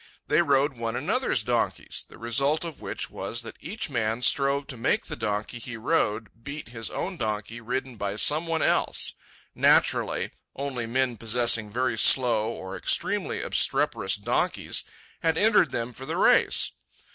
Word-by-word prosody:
They 150 +4 +4
rode 140 -3 +2
one 115 -1 -3
another's - - 0
donkeys, - - -1
the - - -14
result 135 +8 +1
of 165 -3 -7
which - - -4
was 110 +5 -4
that 115 - -8
each 210 +8 -4
man 115 -3 -1
strove 140 +1 +3
to 135 - -7
make 115 - 0
the - - -5
donkey 105 +3 -3
he 120 0 -7
rode 115 -4 -1
beat 140 -2 -7
his 115 -2 -3
own 185 -1 -4
donkey 110 0 -3
ridden 125 +1 -4
by 100 -1 -2
some 150 +10 +2
one 165 -1 0
else, - - +1 0.4
Naturally, - - +2 0.2
only 130 -4 -4
men 125 0 0
possessing 115 -1 +2
very 120 0 -1
slow 115 -4 +5
or 95 -4 -6
extremely - - 0
obstreperous 95 - +1
donkeys 100 - -1 0.4
had 165 -1 +1
entered 215 +2 +4
them 115 +1 -3
for 130 +3 -9
the - - -2
race. - - +4
120 Hz, 155 wpm, -26 LUFS, 110-140 Hz, 0.4 s, slow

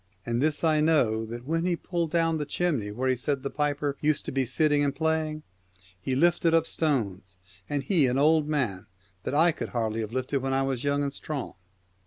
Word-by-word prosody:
And 120 +1 -1
this 155 +2 +1
I 155 -2 +3
know, 115 -9 +2
that 120 +2 -7
when 165 +3 0
he 180 -1 +1
pulled 170 -1 -2
down 165 -1 +1
the 150 - -2
chimney 145 -11 -1
where 125 +6 -2
he 130 - +3
said 135 +2 -2
the 140 - -3
piper 145 -1 -1
used 150 0 +1
to - - -4
be 130 -1 0
sitting 145 +3 +2
and 140 -1 0
playing, 160 0 -1 0.6
he 130 +6 -1
lifted 170 +2 +3
up 165 -1 +3
stones, 100 - -2 0.3
and 145 -2 -1
he 160 -7 +3
an 125 +1 0
old 155 +1 +4
man, 110 -10 -1 0.4
that - - -2
I 165 +3 +5
could 145 - -7
not 110 -2 0
have 110 -1 -3
lifted 130 +2 -1
when 135 0 -2
I 135 0 +2
was 135 -2 -2
young 145 0 +1
and 140 -1 -2
strong.' 145 -3 -5
145 Hz, 215 wpm, -27 LUFS, 130-155 Hz, 0.6 s, I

